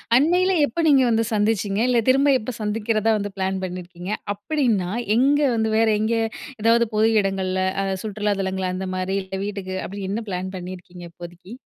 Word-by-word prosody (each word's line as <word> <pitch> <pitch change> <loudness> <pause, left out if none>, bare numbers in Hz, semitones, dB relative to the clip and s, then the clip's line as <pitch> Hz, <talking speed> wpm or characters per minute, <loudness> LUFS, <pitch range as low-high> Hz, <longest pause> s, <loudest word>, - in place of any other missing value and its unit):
அண்மையில 355 +8 +3
எப்ப 285 +4 -6
நீங்க 275 -3 +5
வந்து 225 0 +2
சந்திச்சீங்க? 210 -1 +1
இல்லை, 245 -2 +3
திரும்ப 270 +2 +4
எப்ப 250 +3 -5
சந்திக்கிறதா 215 +1 0
வந்து 205 -1 -4
பிளான் 190 0 -1
பண்ணியிருக்கீங்க? 180 0 -6 0.2
அப்படீன்னா, 210 - 0 0.3
எங்க 275 +5 +4 0.2
வந்து 220 -1 0
வேற 225 0 +3
எங்க? 220 +2 +1 0.5
எதாவது 230 +1 +4
பொது 215 +1 +4
இடங்கள்ல, 190 -1 -1 0.2
அ - - -1 0.2
சுற்றுலா 210 -1 -1
தளங்கள் 190 -1 -2
அந்த 190 +1 -4
மாரி 185 +1 -2
இல்ல 190 0 -6
வீட்டுக்கு, 195 -2 -5
அப்படி 200 +1 -6
என்ன 210 +4 -2
பிளான் 185 0 -4
பண்ணியிருக்கீங்க 180 -1 -9
இப்போதைக்கு? 175 +4 -11
205 Hz, 165 wpm, -22 LUFS, 185-225 Hz, 0.5 s, நீங்க